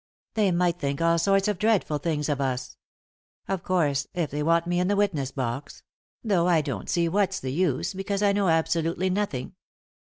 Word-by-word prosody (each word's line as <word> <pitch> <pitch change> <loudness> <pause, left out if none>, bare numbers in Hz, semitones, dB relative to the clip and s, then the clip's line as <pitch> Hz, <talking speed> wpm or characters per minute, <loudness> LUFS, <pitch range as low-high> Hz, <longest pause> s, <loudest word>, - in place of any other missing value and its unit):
They 215 -3 +2
might 175 -1 +1
think 140 -2 -2
all 165 0 +3
sorts 195 +3 +2
of 205 -4 -1
dreadful 205 -8 +1
things 150 -1 -1
of 145 -2 -1
us. 130 -2 -2 0.7
Of 190 -2 -2
course, 145 -7 0
if 170 -5 -1
they 145 +1 -2
want 165 +2 +2
me 175 0 0
in 180 - +1
the 205 - +2
witness 175 -10 0
box— 130 0 -5 0.4
though 190 -6 +2
I 170 -3 +4
don't 135 -9 -5
see 170 -1 +2
what's 195 +2 +1
the 130 0 -4
use, 175 +2 0
because 195 +1 -2
I 200 - +4
know 200 -1 +1
absolutely 165 +2 +1
nothing." 185 -10 -2
170 Hz, 190 wpm, -26 LUFS, 150-195 Hz, 0.7 s, I